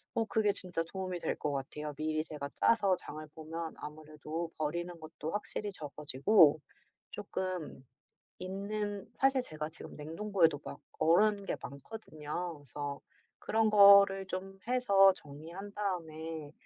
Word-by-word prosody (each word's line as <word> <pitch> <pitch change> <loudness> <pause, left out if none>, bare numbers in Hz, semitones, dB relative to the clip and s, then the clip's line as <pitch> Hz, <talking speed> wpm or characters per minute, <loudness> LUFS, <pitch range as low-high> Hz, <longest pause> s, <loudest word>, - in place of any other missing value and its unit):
어 225 - +2
그게 215 -1 +2
진짜 180 -4 -2
도움이 185 -2 -3
될 - - -1
것 150 - -2
같아요. 145 +2 -4
미리 155 +1 -1
제가 145 -3 -5
짜서 200 -5 +4
장을 155 -2 -8
보면 160 +1 -5
아무래도 155 +2 -6
버리는 170 +3 -2
것도 155 0 -6
확실히 205 0 -3
적어지고 150 +1 +3 0.5
쪼끔 185 -8 -4 0.5
있는 200 +2 -4
사실 270 -1 +3
제가 155 -8 -5
지금 160 - -10
냉동고에도 165 0 +1
막 - - -8 0.2
얼은 200 +6 +4
게 - - -1
많거든요. 155 +1 -6
그래서 145 0 -6 0.4
그런 220 0 +2
거를 200 -1 +8
좀 190 +1 -6
해서 200 -6 +6
정리한 170 +6 -9
다음에 160 -6 -4
170 Hz, 280 characters per minute, -32 LUFS, 155-200 Hz, 0.5 s, 거를